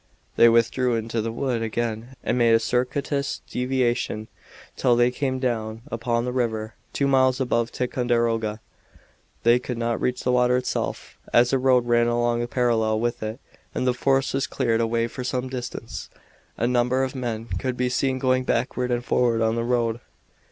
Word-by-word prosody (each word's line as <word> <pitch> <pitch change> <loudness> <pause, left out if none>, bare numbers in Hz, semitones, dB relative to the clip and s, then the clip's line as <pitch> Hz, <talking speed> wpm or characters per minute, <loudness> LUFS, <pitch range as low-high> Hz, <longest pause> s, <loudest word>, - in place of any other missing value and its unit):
They 115 - +7
withdrew 115 +2 +2
into 115 0 -2
the 115 +1 -3
wood 120 0 -1
again 115 +2 -3
and - - 0
made 115 -2 +4
a - - +4
circuitous 140 +4 -1
deviation 125 -4 -1 0.5
till 125 -2 +3
they 120 +1 +3
came 130 0 -1
down 115 -3 -2
upon 115 0 -1
the 125 - -2
river, 110 -3 -2 0.2
two 140 - 0
miles 130 -1 +3
above 120 -2 0
Ticonderoga. 115 -3 0 0.8
They 120 +1 +5
could 125 -1 -5
not 115 0 -1
reach 125 0 -1
the 125 - +1
water 125 0 +3
itself, 125 - -3
as 120 +2 +4
a 135 - +3
road 130 -2 +3
ran 120 0 +3
along 120 0 +1
parallel 115 -3 +1
with 120 +1 -1
it 110 +3 -4 0.4
and - - -1
the 125 - +3
forest 135 +2 +1
was 135 0 0
cleared 115 -4 0
away 115 0 +1
for 125 +2 -6
some 130 0 -2
distance. 125 -2 -6 0.5
A 120 - 0
number 125 +2 +2
of 130 - -2
men 120 -4 -3
could 130 +1 -3
be 125 - +1
seen 130 +1 0
going 130 0 +1
backward 125 +1 -1
and 120 0 -1
forward 120 -2 +2
on 110 0 +2
the 115 0 -1
road. 120 -1 0
120 Hz, 175 wpm, -24 LUFS, 115-125 Hz, 0.8 s, They